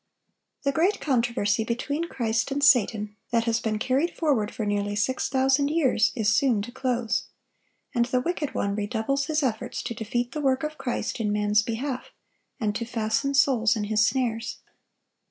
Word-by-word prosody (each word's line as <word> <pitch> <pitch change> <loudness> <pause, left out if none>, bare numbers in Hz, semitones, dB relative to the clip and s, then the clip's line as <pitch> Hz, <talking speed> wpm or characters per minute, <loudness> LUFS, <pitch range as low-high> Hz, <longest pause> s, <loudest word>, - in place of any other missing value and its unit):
] - - -45
The 280 - +2
great 355 +8 +2
controversy 235 -5 +1
between 285 +8 -2
Christ 230 -7 -1
and 280 +1 -2
Satan, 215 -5 +3
that 230 -1 +2
has 230 -1 +1
been 220 -2 -1
carried 260 +9 0
forward 265 -10 +1
for 220 - -4
nearly 205 0 -1
six 255 +5 0
thousand 270 +1 +2
years, 285 -8 +2
is 220 -2 +2
soon 245 -7 +2
to 240 - -7
close; 245 -3 -1 0.7
and 240 -2 +2
the 255 +1 +1
wicked 310 +1 -2
one 200 - 0
redoubles 220 +6 -1
his 310 -1 0
efforts 245 0 -2
to - - -3
defeat 240 +2 -2
the 300 - -4
work 265 -1 +1
of 305 0 -4
Christ 245 -1 -3
in 210 -2 0
man's 210 0 +3
behalf, 250 +4 -4 0.5
and 210 -2 -1
to - - -3
fasten 230 +4 -1
souls 245 -4 +4
in 215 - -2
his 215 +1 +2
snares. 235 -2 -1
240 Hz, 175 wpm, -26 LUFS, 220-275 Hz, 0.7 s, souls